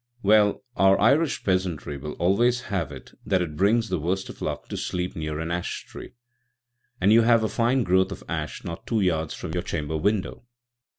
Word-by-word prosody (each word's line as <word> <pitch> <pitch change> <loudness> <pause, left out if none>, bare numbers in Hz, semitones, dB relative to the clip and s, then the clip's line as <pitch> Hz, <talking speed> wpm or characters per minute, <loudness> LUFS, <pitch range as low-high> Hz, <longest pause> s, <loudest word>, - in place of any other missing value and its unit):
"Well, 105 +2 +4
our 95 0 +4
Irish 140 +8 +3
peasantry 90 -6 -1
will 75 +2 -6
always 120 +7 +2
have 90 -5 -1
it - - -11
that 95 -5 +1
it 75 -3 -6
brings 110 +5 +2
the 90 - -1
worst 95 +5 -2
of - - -11
luck - - -4
to - - -4
sleep 90 0 -3
near 75 -1 -4
an 80 +1 -3
ash 85 0 -3
tree, - - -11 0.9
and 100 +4 +4
you 115 - +7
have 115 -1 +4
a - - +2
fine 120 +4 +1
growth 95 0 +2
of 100 - -7
ash - - -4
not 85 +1 -7
two 115 -3 +1
yards 80 -4 0
from - - -6
your 90 +1 -1
chamber 80 -4 -3
window. 100 +4 -1
95 Hz, 195 wpm, -25 LUFS, 85-110 Hz, 0.9 s, you